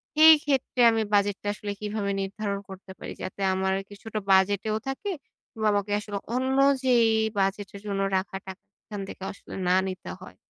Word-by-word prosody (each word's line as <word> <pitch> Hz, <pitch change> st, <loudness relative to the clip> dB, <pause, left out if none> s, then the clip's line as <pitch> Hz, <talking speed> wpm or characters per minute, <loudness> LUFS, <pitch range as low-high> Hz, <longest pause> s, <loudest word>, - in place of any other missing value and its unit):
সেই 315 Hz, +1 st, +10 dB
ক্ষেত্রে 265 Hz, -3 st, 0 dB
আমি 225 Hz, -, +1 dB
বাজেটটা 205 Hz, 0 st, +1 dB
আসলে 205 Hz, 0 st, -5 dB
কিভাবে 210 Hz, -1 st, -2 dB
নির্ধারণ 200 Hz, +1 st, -3 dB
করতে 190 Hz, 0 st, -10 dB
পারি? -, -, -6 dB
যাতে 185 Hz, +1 st, -6 dB
আমার 190 Hz, 0 st, 0 dB, 0.2 s
কিছুটা 215 Hz, +1 st, -6 dB
বাজেটেও 200 Hz, +3 st, +3 dB
থাকে 270 Hz, +10 st, -3 dB, 0.4 s
কিংবা 220 Hz, -1 st, -1 dB
আমাকে 205 Hz, 0 st, -1 dB
আসলে 205 Hz, -1 st, -5 dB, 0.2 s
অন্য 260 Hz, +1 st, 0 dB, 0.3 s
যেই 245 Hz, -3 st, +4 dB, 0.3 s
বাজেটের 195 Hz, +1 st, -1 dB
জন্য 195 Hz, -1 st, -1 dB, 0.2 s
রাখা 190 Hz, 0 st, -3 dB
টাকা 190 Hz, 0 st, -8 dB, 0.2 s
সেখান 205 Hz, -2 st, -7 dB
থেকেও 190 Hz, -, -7 dB
আসলে -, -, -13 dB
না 180 Hz, -, +4 dB
নিতে 185 Hz, 0 st, -6 dB
হয়। -, -, -11 dB
205 Hz, 165 wpm, -26 LUFS, 195-220 Hz, 0.4 s, সেই